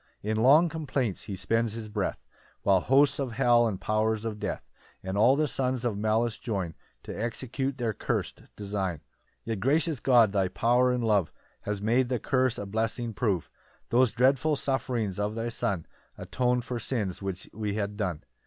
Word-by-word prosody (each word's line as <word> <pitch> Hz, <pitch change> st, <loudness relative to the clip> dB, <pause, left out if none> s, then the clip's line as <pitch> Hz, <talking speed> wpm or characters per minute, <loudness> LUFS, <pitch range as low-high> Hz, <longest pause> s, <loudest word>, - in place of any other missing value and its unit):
2 105 Hz, -, -3 dB
In 110 Hz, -, 0 dB
long 140 Hz, +9 st, +6 dB
complaints 140 Hz, -, -2 dB
he 100 Hz, -, -5 dB
spends 115 Hz, +3 st, 0 dB
his 110 Hz, -1 st, -6 dB
breath, 105 Hz, -2 st, -3 dB, 0.4 s
While 95 Hz, -2 st, +4 dB
hosts 135 Hz, +8 st, +3 dB
of 130 Hz, -4 st, -2 dB
hell, 120 Hz, 0 st, +4 dB
and 100 Hz, -4 st, -3 dB
powers 110 Hz, +1 st, 0 dB
of 105 Hz, -2 st, -4 dB
death, -, -, -4 dB, 0.4 s
And 95 Hz, +1 st, -3 dB
all 120 Hz, +6 st, +5 dB
the 155 Hz, +1 st, +1 dB
sons 130 Hz, -2 st, -1 dB
of 115 Hz, -4 st, 0 dB
malice 110 Hz, +2 st, 0 dB
join 95 Hz, -8 st, -3 dB, 0.3 s
To -, -, -7 dB
execute 130 Hz, +4 st, -3 dB
their 115 Hz, -4 st, -1 dB
curst -, -, -3 dB
design. 100 Hz, -5 st, -3 dB, 0.4 s
3 115 Hz, -, -3 dB
Yet, 105 Hz, -, -4 dB
gracious 150 Hz, -, +1 dB
God, 120 Hz, -6 st, +5 dB
thy 95 Hz, -2 st, +1 dB
power 125 Hz, +6 st, +2 dB
and 125 Hz, -1 st, -1 dB
love 105 Hz, -7 st, +2 dB, 0.3 s
Has 105 Hz, -1 st, -3 dB
made 120 Hz, +3 st, +2 dB
the 125 Hz, -, +1 dB
curse 130 Hz, 0 st, +1 dB
a 100 Hz, -, -4 dB
blessing 110 Hz, +3 st, -2 dB
prove; 100 Hz, -, 0 dB, 0.4 s
Those 125 Hz, +1 st, +4 dB
dreadful 130 Hz, +6 st, +2 dB
sufferings 125 Hz, -7 st, -1 dB
of 105 Hz, +1 st, -1 dB
thy 115 Hz, +1 st, -2 dB
Son 95 Hz, -7 st, -2 dB, 0.3 s
Aton'd 125 Hz, -1 st, 0 dB
for 125 Hz, -1 st, -3 dB
sins 105 Hz, -6 st, -2 dB
which 95 Hz, -1 st, -5 dB
we 105 Hz, -1 st, -3 dB
had 105 Hz, -1 st, -2 dB
done. 90 Hz, -7 st, -3 dB
115 Hz, 180 wpm, -28 LUFS, 105-125 Hz, 0.4 s, long